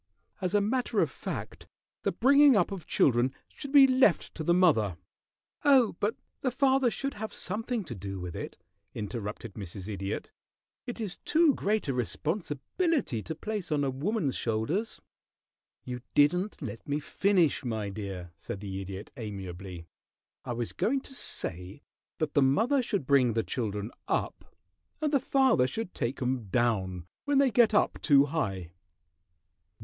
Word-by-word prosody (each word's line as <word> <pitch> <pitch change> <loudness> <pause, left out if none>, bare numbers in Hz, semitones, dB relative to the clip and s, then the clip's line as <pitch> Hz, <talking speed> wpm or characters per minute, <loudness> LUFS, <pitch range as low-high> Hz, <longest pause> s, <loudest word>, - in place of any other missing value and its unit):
As 185 +1 0
a 205 - +5
matter 245 +5 0
of - - +2
fact, - - -6 0.3
the - - 0
bringing 280 +1 +6
up 200 -1 +2
of 185 -5 -6
children 125 +1 +3
should 280 - -8
be 280 -2 +9
left 255 -7 +3
to 160 - -5
the 170 - +2
mother 140 - +3 0.3
" - - -65 0.3
"Oh, 265 -8 +5
but 210 +4 0 0.3
the 260 - +1
father 265 0 +3
should 275 +4 -3
have 220 +1 -5
something 225 +3 -2
to 145 - -7
do 95 -1 -6
with 90 -1 -6
it," - - -6 0.4
interrupted 105 0 -5
Mrs. 95 -1 -7
Idiot. 100 -2 -4 0.6
"It 245 - -5
is 205 -5 -3
too 320 -2 +3
great 210 -4 0
a 135 - 0
responsibility 155 - -1
to 160 - -5
place 205 -1 -4
on 145 -1 +2
a 135 - 0
woman's 150 - -1
shoulders." 120 - -1 0.9
"You 125 -1 -5
didn't 180 +8 +2
let 110 0 -7
me 145 +1 0
finish, 180 -1 +2
my 110 -4 -2
dear," 95 -4 -6
said 90 +3 -7
the 95 -1 -5
Idiot, 95 +1 -7
amiably. 95 -5 -7 0.6
"I 120 - -3
was 120 -1 -3
going 270 +4 +1
to 270 - -12
say 90 - -4 0.3
that 155 -2 -2
the 145 - +4
mother 225 - +3
should 200 - -2
bring 130 -4 +4
the 115 0 +1
children 105 -2 -3 0.2
up, - - -3 0.4
and 305 -1 -1
the 280 - +5
father 260 - +3
should 185 - -4
take 125 +1 -2
'em 125 -2 -1
down 95 -5 0 0.2
when 285 -1 +2
they 275 -2 +4
get 225 -1 +4
up - - +2
too 140 -2 +6
high." 95 - -3
145 Hz, 160 wpm, -29 LUFS, -, 0.9 s, be